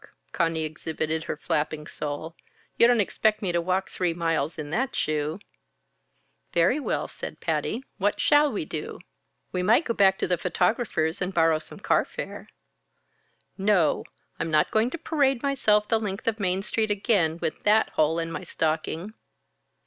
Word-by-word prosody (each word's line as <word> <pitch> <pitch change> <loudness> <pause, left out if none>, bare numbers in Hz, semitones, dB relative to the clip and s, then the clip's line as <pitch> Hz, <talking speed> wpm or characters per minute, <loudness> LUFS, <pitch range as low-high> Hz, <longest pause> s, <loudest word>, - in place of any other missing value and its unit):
Conny 165 -1 0
exhibited 155 0 -3
her - - -3
flapping 150 0 -2
sole. 150 +2 -5 0.4
"You 235 - +6
don't 240 -1 +4
expect 215 +1 +1
me 185 - +1
to 170 0 +1
walk 185 +2 0
three 175 -3 -1
miles 165 -2 -1
in 150 -1 -6
that 260 +8 -1
shoe?" 155 +1 -1 1.2
"Very 180 - +3
well," 290 - -2
said - - -8
Patty. 240 +4 -1 0.2
"What 200 +2 +1
shall 295 -1 +4
we 200 -8 -3
do?" 155 +1 -6 0.5
"We 180 - -1
might 225 - +4
go 230 - 0
back 195 -3 +4
to - - -1
the 180 -1 +1
photographer's 180 -3 0
and 180 +1 -1
borrow 165 -1 +4
some 155 - -11
car - - +3
fare." - - -7 1.1
"No! 190 -5 +3 0.4
I'm 165 - -2
not 155 -1 +2
going 220 +2 +2
to 340 - -5
parade 280 -6 +1
myself 215 -7 +2
the 225 0 +2
length 205 -1 -5
of 225 -1 0
Main 190 -1 0
Street 220 +1 0
again 195 -6 +1
with 155 - -3
that 215 +1 +4
hole 155 +1 +1
in 165 0 -2
my - - -5
stocking." 160 +5 -2
180 Hz, 165 wpm, -26 LUFS, 160-220 Hz, 1.2 s, You